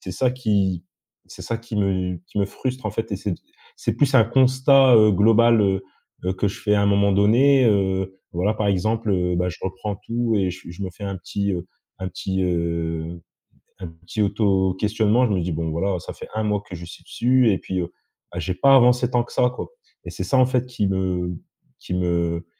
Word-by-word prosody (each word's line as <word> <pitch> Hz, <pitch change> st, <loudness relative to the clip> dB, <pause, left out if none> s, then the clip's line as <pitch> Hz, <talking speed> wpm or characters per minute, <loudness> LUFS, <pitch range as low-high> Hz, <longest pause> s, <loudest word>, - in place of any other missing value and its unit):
C'est 95 Hz, -, -7 dB
ça 125 Hz, +7 st, +1 dB
qui 100 Hz, -8 st, 0 dB, 0.4 s
c’est -, -, -11 dB
ça 115 Hz, -, -3 dB
qui 115 Hz, -1 st, -9 dB
me 95 Hz, -3 st, -1 dB
qui -, -, -5 dB
me 100 Hz, -, +2 dB
frustre, 130 Hz, +2 st, -5 dB
en -, -, -2 dB
fait, 115 Hz, 0 st, -4 dB
et -, -, -1 dB
c'est 100 Hz, -1 st, -3 dB
p -, -, -17 dB, 0.4 s
c’est -, -, -2 dB
plus 140 Hz, -2 st, +1 dB
un 115 Hz, -4 st, +7 dB
constat, 130 Hz, +1 st, +4 dB
heu, 110 Hz, -1 st, +6 dB
global, 115 Hz, +3 st, +4 dB
heu 95 Hz, -1 st, +1 dB, 0.4 s
heu, 95 Hz, -, 0 dB
que 100 Hz, +1 st, 0 dB
je -, -, -7 dB
fais 105 Hz, -1 st, +1 dB
à 100 Hz, -, +2 dB
un -, -, +2 dB
moment 100 Hz, 0 st, +3 dB
donné. 125 Hz, +7 st, +4 dB
Heu, 95 Hz, -2 st, 0 dB
voilà, 95 Hz, +5 st, 0 dB
par 105 Hz, -1 st, -1 dB
exemple, 110 Hz, +3 st, 0 dB
heu, 90 Hz, -2 st, +1 dB
bah, 90 Hz, +1 st, 0 dB
je 90 Hz, -, -7 dB
reprends 95 Hz, +2 st, -4 dB
tout 115 Hz, +1 st, -2 dB
et 95 Hz, -2 st, +1 dB
je 90 Hz, -1 st, -10 dB
je 85 Hz, +3 st, -8 dB
me 95 Hz, -, -4 dB
fais 100 Hz, +3 st, -10 dB
un 100 Hz, -1 st, -4 dB
petit, 100 Hz, +2 st, -3 dB
heu, 90 Hz, 0 st, -4 dB, 0.3 s
un 95 Hz, 0 st, -4 dB
petit, 95 Hz, +1 st, -3 dB
heu, 85 Hz, -1 st, -2 dB, 0.6 s
un 90 Hz, -, -6 dB
petit 85 Hz, +6 st, -6 dB
auto 95 Hz, -2 st, +1 dB
questionnement. 110 Hz, +4 st, +2 dB
Je -, -, -3 dB
me 90 Hz, -, 0 dB
dis: 85 Hz, 0 st, -3 dB
«Bon, 80 Hz, +1 st, -2 dB
voilà, 90 Hz, +2 st, -1 dB
ça -, -, -8 dB
fait -, -, -11 dB
un 110 Hz, -, -1 dB
mois 105 Hz, -1 st, 0 dB
que 90 Hz, -, -8 dB
je 85 Hz, 0 st, -8 dB
suis 85 Hz, -, -12 dB
dessus 125 Hz, -1 st, +2 dB
et 95 Hz, -, +1 dB
puis, 95 Hz, -1 st, -3 dB
heu, 85 Hz, +1 st, -5 dB, 0.4 s
bah, -, -, -4 dB
j'ai 90 Hz, -, -2 dB
pas 135 Hz, +5 st, +4 dB
avancé 125 Hz, -1 st, +4 dB
tant 120 Hz, -1 st, +2 dB
que -, -, -14 dB
ça, 125 Hz, -, +3 dB
quoi» 125 Hz, -, -7 dB, 0.4 s
et -, -, -7 dB
c'est -, -, -5 dB
ça, 135 Hz, -, +1 dB
en 130 Hz, -, +6 dB
fait, 125 Hz, -1 st, 0 dB
qui 105 Hz, -5 st, -1 dB
me 90 Hz, -2 st, -1 dB, 0.5 s
qui -, -, -6 dB
me 85 Hz, -1 st, -1 dB
100 Hz, 230 wpm, -22 LUFS, 90-115 Hz, 0.6 s, un